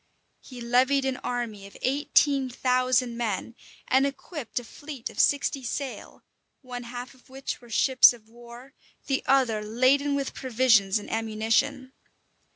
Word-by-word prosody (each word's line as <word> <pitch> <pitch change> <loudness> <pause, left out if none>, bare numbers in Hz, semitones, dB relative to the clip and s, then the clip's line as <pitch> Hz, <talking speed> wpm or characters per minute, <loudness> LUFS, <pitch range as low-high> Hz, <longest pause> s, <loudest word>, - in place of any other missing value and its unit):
He 250 -2 -11
levied 260 +3 +2
an 265 -1 -1
army 230 -6 -4
of 200 - -15
eighteen 275 0 +2
thousand 250 -1 +1
men, 230 -1 -3 0.3
and 265 +2 +3
equipped 275 - -6
a - - -10
fleet 275 +1 -8
of - - -10
sixty 280 -1 +2
sail, 260 +2 -6 0.4
one 245 -1 -7
half 245 +2 -7
of 260 0 -24
which 265 0 -6
were 240 - -16
ships 260 +3 +6
of 230 -3 -13
war, 240 +3 -14 0.3
the 270 -1 0
other 255 -5 +3
laden 260 +6 +2
with 275 -1 -3
provisions 225 -6 +3
and 205 - -7
ammunition. 225 +5 -1
250 Hz, 145 wpm, -26 LUFS, 235-270 Hz, 0.4 s, ships